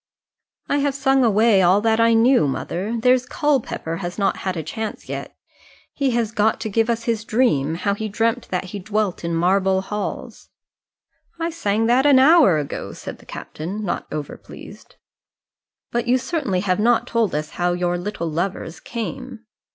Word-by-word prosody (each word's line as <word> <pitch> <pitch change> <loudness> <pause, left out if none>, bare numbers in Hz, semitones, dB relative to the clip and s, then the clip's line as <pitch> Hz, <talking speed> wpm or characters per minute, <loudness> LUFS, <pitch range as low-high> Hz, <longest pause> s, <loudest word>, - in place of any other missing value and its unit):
"I 285 - +1
have 285 -1 0
sung 270 -1 +2
away 220 -2 +4
all 185 +2 +5
that 225 0 +2
I 230 0 +4
knew, 235 - +4
mother. 190 - -3
There's 250 +1 +3
Culpepper 270 - -1
has 175 -1 -5
not 200 -2 +1
had 185 -2 -3
a 160 - -3
chance 220 +7 -6
yet. - - -6 0.6
He 275 -2 0
has 235 -3 0
got 215 0 +1
to 220 - -3
give 225 +3 +1
us 230 0 -1
his 225 -2 -1
dream 215 - +1
how 200 +4 0
he 215 +1 -4
'dreamt 230 +3 0
that 180 0 -1
he 190 +2 -7
dwelt 210 -1 -2
in 170 0 -2
marble 190 +2 +2
halls!'" 210 +2 -6 0.9
"I 330 +1 -1
sang 225 -9 0
that 250 +4 +3
an 280 -2 +6
hour 270 - +6
ago," 145 -2 -5
said - - -8
the - - -19
captain, 195 +7 -6
not 175 - -3
over 150 -2 -5
pleased. - - -13 1.0
"But 240 0 -1
you 250 +1 +4
certainly 260 - -2
have 185 0 0
not 235 +2 +3
told 230 -7 0
us 150 0 -3
how 175 0 0
'your 175 0 -1
little 180 -2 -4
lovers 165 +1 -3
came!'" 240 0 -6
215 Hz, 175 wpm, -21 LUFS, 180-240 Hz, 1.0 s, an